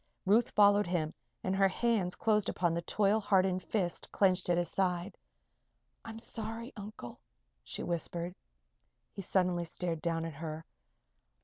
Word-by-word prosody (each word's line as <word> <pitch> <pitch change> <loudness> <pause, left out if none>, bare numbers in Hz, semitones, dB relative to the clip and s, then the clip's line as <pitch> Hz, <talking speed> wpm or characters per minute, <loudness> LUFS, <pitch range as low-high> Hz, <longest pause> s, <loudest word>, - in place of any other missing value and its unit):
Ruth 220 +5 +4
followed 205 -1 +5
him 165 -3 -1 0.3
and 185 - 0
her 195 0 +5
hands 195 -2 0
closed 215 -2 +2
upon 175 -2 +1
the 170 - -1
toil 205 +5 +2
hardened 190 -3 +2
fist 185 -5 -2
clenched 185 -2 +2
at 175 - +3
his 175 0 +1
side. 185 0 0 0.9
"I'm 225 0 -8
sorry, 225 +1 -5
Uncle," 205 - -8 0.4
she - - -6
whispered. 170 +1 -2 0.8
He 195 - -6
suddenly 180 -2 +1
stared 170 -1 -3
down 165 0 -1
at 165 - -5
her. 160 +2 -6
185 Hz, 140 wpm, -32 LUFS, 170-210 Hz, 0.9 s, followed